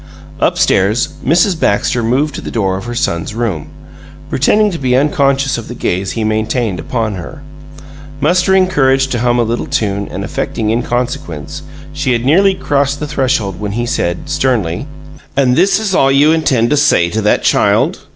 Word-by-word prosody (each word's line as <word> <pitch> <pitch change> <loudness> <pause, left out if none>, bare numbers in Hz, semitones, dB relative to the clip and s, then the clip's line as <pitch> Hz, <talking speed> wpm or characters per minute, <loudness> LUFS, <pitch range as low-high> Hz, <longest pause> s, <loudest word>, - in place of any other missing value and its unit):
Up - - +1
stairs, 105 +6 +2
Mrs. 170 +4 +2
Baxter 105 +4 +1
moved 135 +6 0
to - - -6
the - - -6
door 95 -5 -1
of 95 - -6
her 120 0 -5
son's 85 -1 -2
room, 110 -10 -2 0.6
pretending 210 +10 +2
to 170 - -5
be 125 -2 +1
unconscious 135 -1 +1
of 115 - -9
the 120 - -7
gaze 95 -3 -2
he 115 - -2
maintained 110 -2 -1
upon 110 +4 -2
her. 140 - -8 0.8
Mustering 185 +5 +3
courage 135 -6 +2
to 120 - -2
hum 120 0 +1
a 120 - +3
little 115 +1 -2
tune 100 -2 -1
and - - -6
affecting 110 -1 -2
inconsequence, 120 - -3 0.3
she 145 -3 0
had 120 0 -1
nearly 190 +7 +4
crossed 140 -3 0
the 150 - -3
threshold 130 -10 -1
when 105 -1 -4
he 120 +2 -2
said, 85 -6 -1
sternly: 130 - -1 0.5
"And 130 -3 +3
this 185 +5 +3
is 215 -3 -2
all 135 -5 +3
you 145 +3 +4
intend 135 -7 +1
to 150 - +3
say 115 -12 +3
to 110 - -1
that 105 - +1
child?" - - +2
125 Hz, 180 wpm, -14 LUFS, 110-145 Hz, 0.8 s, nearly